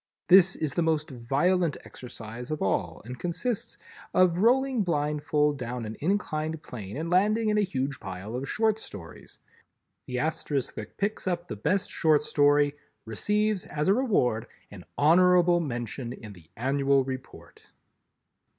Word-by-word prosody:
This 190 0 +7
is 150 -4 -2
the 170 - 0
most 155 -2 0
violent 145 +7 +1
exercise 120 0 -8
of 155 -1 -2
all 85 -4 -1
and 125 +1 -8
consists 180 +7 -2 0.4
of 180 -1 +4
rolling 255 +3 +3
blindfold 150 -3 0
down 120 -1 -4
an 110 +1 -6
inclined 160 -3 -1
plane 105 -2 -7
and 160 +2 -3
landing 210 +5 +2
in 210 0 +2
a - - +4
huge 140 -7 -2
pile 95 +4 -7
of 135 +2 -4
short 220 0 +1
stories. 85 - -10 0.7
The 125 - -3
Asterisk 150 -2 -1
that 105 - -9
picks 205 -1 -2
up 175 -1 -1
the - - -5
best 185 - 0
Short 155 -2 +3
Story, 145 -1 +3 0.3
receives 210 - 0
as 150 +2 -2
a 195 - +6
reward 125 - +1 0.2
an 95 -4 -11
honorable 175 +3 +5
mention 120 -4 -4
in 105 -4 -10
the 85 -4 -18
Annual 135 +2 +2
Report. 130 0 -9
150 Hz, 150 wpm, -27 LUFS, 125-180 Hz, 0.7 s, This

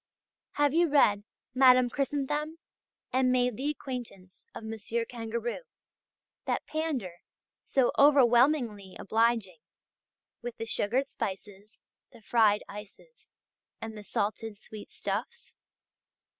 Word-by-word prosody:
Have 290 -1 +2
you 340 +1 +4
read 210 -8 +4 0.3
"Madame 255 -1 +6
Chrysanthème," 295 +4 -2 0.6
and 255 0 +3
made 250 -2 +2
the 275 +6 -2
acquaintance 245 -10 -7
of - - -7
Monsieur 225 +1 -3
Kangourou, 235 0 -4 0.9
that - - -1
pander, 270 - -3 0.5
so 265 -3 +2
overwhelmingly 245 -7 +4
obliging, 220 -5 0 0.8
with 240 0 -6
the 225 - -4
sugared 235 +4 0
spices, 200 +2 -7 0.3
the - - -16
fried 210 -1 +3
ices, 210 - -12 0.5
and 225 -1 -7
the 210 - -9
salted 210 +1 -3
sweetstuffs? 210 - -6
235 Hz, 100 wpm, -29 LUFS, 210-270 Hz, 0.9 s, Madame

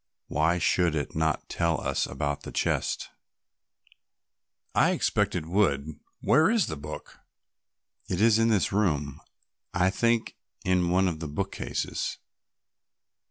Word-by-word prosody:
Why 80 +4 +2
should 85 -2 +2
it 75 -3 -3
not 80 -1 0
tell 85 -1 0
us - - -1
about 70 0 -3
the - - -8
chest?" - - -1 1.6
"I - - +4
expect - - +1
it - - -2
would; 80 -5 0 0.2
where 155 +6 +4
is 225 -4 +3
the 80 - -4
book?" 75 +1 -9 0.9
"It 90 - -1
is 110 0 +5
in 115 - +4
this 105 -5 +2
room, 75 -9 0 0.5
I 90 +1 +3
think, 115 +2 0 0.3
in 90 -1 +2
one 95 +2 +3
of 80 -3 -2
the 80 - -4
bookcases." 95 +7 -3
90 Hz, 130 wpm, -27 LUFS, 75-100 Hz, 1.6 s, is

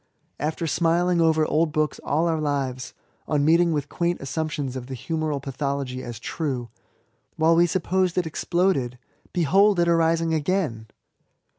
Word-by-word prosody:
After 155 +3 -2
smiling 170 +2 +2
over 160 -1 +3
old 155 +1 +1
books 155 0 -1
all 160 +4 +1
our 160 -2 0
lives, 135 -4 -2 0.3
on 145 -2 +1
meeting 170 +2 +4
with 150 -2 -1
quaint 175 +2 -1
assumptions 145 -2 -3
of 125 -1 -6
the 135 - -5
Humoral 155 +1 -2
pathology 135 -1 -3
as 120 -3 -7
true, 130 -3 -3 0.7
while 160 +1 +3
we 170 +1 +5
supposed 185 +1 0
it 180 - +2
exploded 160 -6 0 0.3
beheld 190 +4 +3
it 170 - +3
arising 165 -1 +2
again 155 - -1
160 Hz, 145 wpm, -24 LUFS, 140-170 Hz, 0.7 s, we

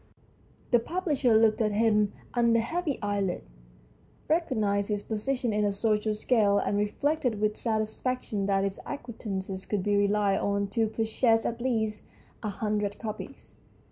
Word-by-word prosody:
The 240 - +6
publisher 290 -5 +1
looked 220 0 +3
at 215 -1 +1
him 210 -1 +3 0.2
under 235 -1 +3
heavy 310 +5 -1
eyelids, 200 -3 -1 0.8
recognised 215 - +1
his 205 -1 -1
position 240 +2 -1
in 210 0 +1
the 205 - +2
social 210 +1 0
scale, 210 -2 +3
and 200 - 0
reflected 245 +3 0
with 210 0 +1
satisfaction 220 -1 -2
that 195 -1 +2
his 195 -1 -2
acquaintances 200 -8 -5
could 205 -3 -1
be 205 +1 +2
relied 200 -1 +2
on 200 0 0
to 225 +2 +1
purchase 225 +1 +1
at 235 0 -2
least 220 -4 0 0.4
a 215 - -2
hundred 210 0 -2
copies. 215 -2 -7
215 Hz, 140 wpm, -28 LUFS, 205-235 Hz, 0.8 s, The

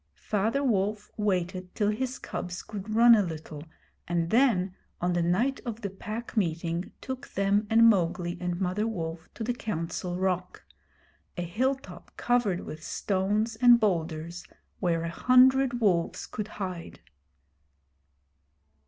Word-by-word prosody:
Father 220 +7 0
Wolf 210 -3 0
waited 185 -3 -2
till 205 -1 +1
his 260 +4 -3
cubs 180 0 -5
could 215 0 -6
run 235 +1 +8
a 220 - +6
little, 155 -4 -6 0.4
and 170 -1 -1
then 220 -7 +3 0.3
on 175 0 0
the 175 - +1
night 210 +11 +1
of 235 -2 -5
the 200 -3 -3
Pack 215 +4 -6
Meeting 170 -2 -1
took 260 +1 -6
them 200 +2 +1
and 230 +1 +6
Mowgli 175 -4 +2
and 175 -1 -2
Mother 195 +3 0
Wolf 165 -6 -5
to 225 - -4
the 245 +2 0
Council 180 -5 -4
Rock 185 -1 -2 0.7
a 175 - -1
hilltop 215 0 -3
covered 235 -7 +1
with 155 +1 -8
stones 205 +5 0
and 240 0 +7
boulders 170 -4 -1 0.4
where 170 -3 0
a 170 - -2
hundred 255 +3 +4
wolves 180 -6 +1
could 210 -1 -5
hide. 185 -5 -6
195 Hz, 135 wpm, -28 LUFS, 175-225 Hz, 0.7 s, run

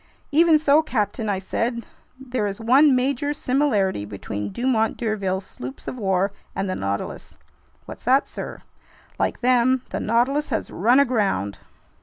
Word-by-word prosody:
"Even 320 +1 +5
so, 300 0 +4
captain," 220 -6 -2
I 200 - 0
said, 230 +5 -2 0.3
"there 250 -5 -2
is 195 +1 -5
one 260 +5 +5
major 280 +3 0
similarity 235 - +1
between 100 0 -5
Dumont 235 -3 0
d'Urville's 195 -4 -2
sloops 130 -4 -9
of - - -4
war 195 -3 0 0.2
and 195 - -1
the 185 - -1
Nautilus." 100 - -4 0.5
"What's - - -10
that, 265 +3 +4
sir?" - - -7 0.6
"Like - - -1
them, 250 +1 +3
the - - -2
Nautilus 255 +7 +1
has 225 - -2
run 240 +8 +3
aground!" 200 - +1
235 Hz, 145 wpm, -23 LUFS, 195-260 Hz, 0.6 s, Even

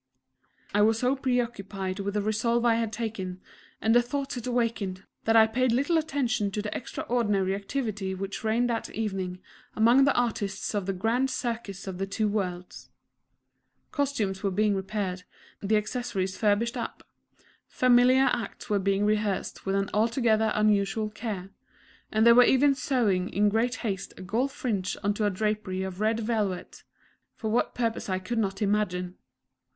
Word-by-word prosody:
I 205 - +3
was 220 +1 +4
so 250 +3 +1
preoccupied 210 -7 -2
with 200 +1 -3
the 210 - +1
resolve 230 +3 +1
I 235 - +5
had 225 -1 0
taken, 210 -5 -4 0.4
and 220 - +2
the 240 - +6
thoughts 270 +2 -3
it 245 0 -5
awakened, 225 -6 -1 0.2
that 225 - +3
I 220 -1 +8
paid 245 +3 +1
little 280 +8 +2
attention 270 -9 0
to 210 - -1
the 210 - -4
extraordinary 210 -6 -1
activity 200 -2 -3
which 195 +3 -5
reigned 225 +3 +2
that 230 - -2
evening 190 -4 -3 0.3
among 240 +5 +5
the 280 - +3
artists 220 -5 -1
of 200 -3 -2
the 195 - 0
"Grand 230 +8 +1
Circus 230 -7 -4
of 190 -2 -6
the 195 - -1
Two 210 +2 0
Worlds." 180 -4 -4 1.0
Costumes 260 -10 -1
were 200 - +1
being 210 +2 +2
repaired, 190 -1 -3 0.4
the 215 +2 +2
accessories 210 -4 -2
furbished 220 +3 +1
up; - - -5 0.6
familiar 255 +1 +4
acts 235 +1 -5
were 205 - +3
being 195 +1 +1
rehearsed 210 -2 -1
with 195 - +1
an 195 0 -1
altogether 220 0 +2
unusual 210 0 +1
care; 210 -3 -5 0.6
and 220 +1 +3
they 235 - +9
were 245 - +8
even 275 +3 +4
sewing 235 -9 0
in 205 +1 +2
great 225 +3 +1
haste 195 -3 -3
a 185 - -8
gold 235 +9 0
fringe 205 -9 -2
onto 205 +1 +1
a - - +3
drapery 205 -1 -2
of 190 +1 -5
red 220 +1 +1
velvet 215 -5 -2 0.5
for 220 -1 -3
what 235 - +1
purpose 230 -4 -2
I 185 - +1
could 205 +5 -3
not 195 -1 -1
imagine. 185 -3 -1
215 Hz, 165 wpm, -27 LUFS, 195-235 Hz, 1.0 s, they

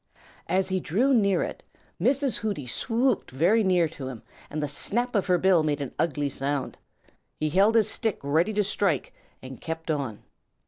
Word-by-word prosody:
As 185 +2 +2
he 185 0 0
drew 230 - +1
near 200 -6 +3
it, - - -6 0.4
Mrs. 265 +4 +2
Hooty 205 - -3
swooped 240 - 0
very 175 - +3
near 180 -3 +3
to 140 -4 -7
him, 125 -4 -8 0.3
and 150 0 -3
the - - 0
snap 240 - -2
of 200 -3 +1
her 180 -1 +4
bill 185 -1 +4
made 150 -2 0
an 140 -3 -5
ugly 145 -3 0
sound. 140 0 -2 0.6
He 155 - 0
held 200 +7 +4
his 220 -3 +4
stick 220 -5 -1
ready 160 +8 +2
to 210 0 +2
strike 195 -7 0 0.3
and 130 -1 -9
kept 165 0 -4
on. 135 -8 -3
175 Hz, 180 wpm, -26 LUFS, 145-210 Hz, 0.6 s, her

